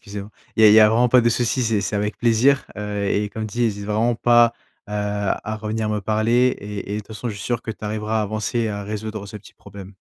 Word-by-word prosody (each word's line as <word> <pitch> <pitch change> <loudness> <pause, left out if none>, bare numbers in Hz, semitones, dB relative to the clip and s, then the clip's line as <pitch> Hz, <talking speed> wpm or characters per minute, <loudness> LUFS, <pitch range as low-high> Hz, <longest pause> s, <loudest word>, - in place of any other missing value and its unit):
excusez-moi. 100 0 -8 0.3
Il 110 - +3
y - - +10
a - - +9
il - - +6
y 110 - +8
a 105 - +7
vraiment 120 +3 +3
pas 125 +1 +6
de 120 - +2
souci, 120 +2 0
c'est 110 -3 +1
c'est 100 +2 -2
avec 105 +1 -2
plaisir, 120 +4 +3
heu, 105 0 -3
et 105 +1 0
comme 110 +2 -5
dit, 120 +3 -1
hésite 100 -3 -2
vraiment 110 +3 +1
pas, 120 0 +4 0.4
heu, - - -8
à 105 +1 -2
revenir 110 0 -3
me 105 -1 -1
parler 115 +5 +2
et 100 0 -6
et - - -2
toute 105 - -10
façon, 110 +3 -5
je 105 - -4
suis 100 - -8
sûr 120 -1 -1
que 110 - -5
tu 105 0 -9
arriveras 110 +1 -2
à - - +1
avancer 110 +3 -2
et 115 - 0
à 100 -1 -4
résoudre 105 0 -5
ce 105 +1 -9
petit 105 - -15
problème. 100 -1 -12
110 Hz, 270 wpm, -21 LUFS, 105-115 Hz, 0.4 s, y